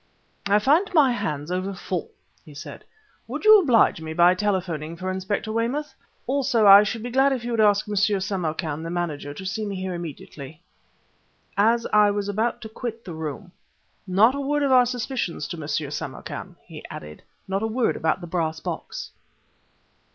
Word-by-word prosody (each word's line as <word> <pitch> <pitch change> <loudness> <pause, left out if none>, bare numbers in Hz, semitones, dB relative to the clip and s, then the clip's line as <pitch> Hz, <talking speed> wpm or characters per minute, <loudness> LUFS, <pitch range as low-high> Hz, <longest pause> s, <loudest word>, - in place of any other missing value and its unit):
"I 200 +1 +4
find 305 - +3
my 285 -5 +6
hands 150 -8 -3
over 185 +2 -2
full," 180 -1 -4 0.3
he 150 - -14
said. 145 - -9 0.4
"Will - - -4
you 430 0 +8
oblige 235 - +3
me 160 0 -5
by 175 +2 +5
telephoning 180 -5 -2
for 185 +1 -3
Inspector 190 +3 -3
Weymouth? 245 +7 -2 0.3
Also, 250 -5 +1
I 200 0 +10
should 215 +2 -3
be 245 - -5
glad 270 +2 +3
if 250 -3 -4
you 240 - -4
would 230 - -1
ask 210 -1 +4
M. 210 - -4
Samarkan, 190 -6 -1
the 165 - -5
manager, 165 -5 -3
to 190 - -8
see 190 +4 -3
me 200 -2 -4
here 185 0 -4
immediately." 155 -2 -8 0.9
As 230 +3 +3
I 210 -1 +6
was 205 0 -2
about 215 +4 -1
to 220 - -8
quit 230 +1 -6
the 175 - -7
room 160 +4 -6 0.6
"Not 205 +7 +4
a 280 - -3
word 290 +1 0
of 275 - +1
our 250 -1 +6
suspicions 245 - -3
to 170 - -5
M. 150 - -6
Samarkan," 150 -2 -5
he - - -11
added; 75 0 -9 0.3
"not 195 +1 -1
a 220 - 0
word 230 +1 0
about 160 +3 0
the - - -6
brass 160 -2 -2
box." - - -6
200 Hz, 180 wpm, -24 LUFS, 170-230 Hz, 0.9 s, I